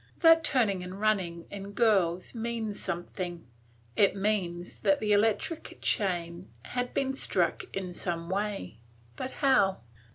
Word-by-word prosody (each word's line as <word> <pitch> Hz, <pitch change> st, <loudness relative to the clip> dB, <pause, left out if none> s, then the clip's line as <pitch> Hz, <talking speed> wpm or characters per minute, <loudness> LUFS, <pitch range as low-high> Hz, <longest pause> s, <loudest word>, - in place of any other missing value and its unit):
That 325 Hz, -1 st, +7 dB
turning 220 Hz, -11 st, +2 dB
and 185 Hz, +2 st, -7 dB
running 185 Hz, -6 st, 0 dB
in 200 Hz, 0 st, -7 dB
girls 195 Hz, -6 st, +2 dB
means 225 Hz, -3 st, -3 dB
something; 175 Hz, -1 st, -4 dB, 0.5 s
it 200 Hz, -1 st, +4 dB
means 190 Hz, -4 st, -1 dB
that 195 Hz, -2 st, +2 dB
the 210 Hz, -1 st, -1 dB
electric 220 Hz, +10 st, +1 dB
chain 175 Hz, -2 st, -1 dB
had 245 Hz, 0 st, -3 dB
been 270 Hz, -1 st, +1 dB
struck 275 Hz, -, +1 dB
in 185 Hz, -2 st, -4 dB
some 170 Hz, -1 st, -3 dB
way; 195 Hz, -, -3 dB, 0.4 s
but 255 Hz, -, -4 dB, 0.2 s
how? 200 Hz, -, +4 dB
200 Hz, 130 wpm, -29 LUFS, 180-220 Hz, 0.5 s, That